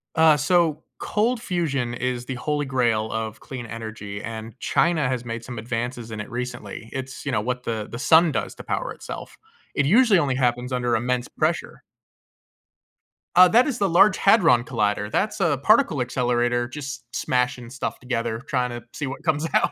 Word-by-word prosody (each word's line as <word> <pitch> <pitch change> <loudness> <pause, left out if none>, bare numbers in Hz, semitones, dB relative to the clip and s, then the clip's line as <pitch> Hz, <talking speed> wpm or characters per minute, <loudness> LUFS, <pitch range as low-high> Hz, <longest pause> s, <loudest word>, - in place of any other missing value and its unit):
Uh, 160 -2 +6
so, 160 +1 +2 0.2
cold 225 +3 0
fusion 140 - -1
is 125 0 -2
the 130 - -4
holy 145 +3 -1
grail 120 -5 +1
of 110 -1 -4
clean 130 -3 -7
energy, 110 -3 -7
and 115 +1 -7
China 160 -6 +2
has 125 -2 -2
made 115 0 -5
some 120 -1 -7
advances 120 +1 -4
in 110 -1 -5
it 105 - -8
recently. 120 -2 -6
It's, 130 0 -6
you 140 - -1
know, 105 - +1
what 125 +2 -3
the 110 -2 -3
the 115 - -6
sun 160 +3 +5
does - - -3
to - - -10
power - - -2
itself. - - -9 0.4
It 145 - +2
usually 215 - +5
only 135 -5 0
happens 125 0 0
under 125 -1 0
immense 125 +2 -1
pressure. - - -2 1.5
Uh, 180 0 +8
that 245 +5 +5
is 255 -4 -2
the 200 -1 +2
Large 185 +3 +5
Hadron 165 - +5
Collider. 105 -3 -1
That's 210 - 0
a 160 -6 +2
particle 215 - +4
accelerator 120 -1 0
just 135 0 -6
smashing 125 -1 -1
stuff 130 +1 -4
together, 115 -3 -2
tryna 125 -3 -1
see 150 - -4
what 135 +4 -7
comes 155 -1 +1
out. - - +3
125 Hz, 175 wpm, -24 LUFS, 120-155 Hz, 1.5 s, Uh